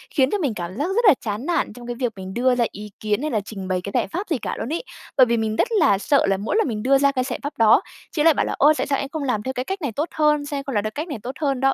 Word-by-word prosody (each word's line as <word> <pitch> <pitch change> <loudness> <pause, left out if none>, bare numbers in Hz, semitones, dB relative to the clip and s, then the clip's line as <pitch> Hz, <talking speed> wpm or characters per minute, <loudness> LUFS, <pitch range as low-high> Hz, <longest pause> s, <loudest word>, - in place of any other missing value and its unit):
khiến 265 -2 +4
cho 415 - +1
mình 285 - -1
cảm 180 +2 -6
giác 295 +5 0
rất 475 0 +2
là 375 - +9
chán 215 +4 -4
nản 335 -10 0
trong 240 +1 -11
cái 240 - -3
việc 245 -3 0
mình 190 0 -7
đưa 250 +1 +2
ra 240 -1 +2
ý 210 +1 -8
kiến 210 +3 -1
hay 305 - -2
là 215 - +1
trình 195 -2 -7
bày 185 -1 -1
cái 200 - -6
giải - - +1
pháp 370 - -4
gì 310 - +1
cả - - -4
luôn 280 +8 -3
ấy. 340 - -2 0.3
Bởi 255 - +8
vì 235 0 +1
mình 220 -1 -1
rất 455 - +2
là 195 - +4
sợ 280 +7 +2
là 195 0 +2
mỗi 210 - -2
lần 445 - +2
mình 215 -2 -3
đưa 275 +1 +4
ra 280 0 +3
cái 255 -2 0
giải 250 -1 -4
pháp 285 0 -5
đó, 225 -2 +6 0.3
chị 300 -3 0
lại 325 -1 +6
bảo - - 0
là - - -2
"Ô, 295 +3 +6
tại - - -1
sao 275 - +1
em 275 - -4
không 310 -2 -4
làm 220 -6 -1
theo 260 - -3
cái 250 +1 -3
cách 385 -1 -4
này 280 -6 -2
tốt 300 +8 -2
hơn? 300 -1 +2
Sao 285 -1 -4
em 275 - -4
không 275 -5 -5
làm 205 - +1
theo 215 - -3
cách 305 +4 -3
này 290 - -4
tốt 250 - -4
hơn 275 -3 0
đó?" 270 0 +3
260 Hz, 360 wpm, -22 LUFS, 215-290 Hz, 0.3 s, là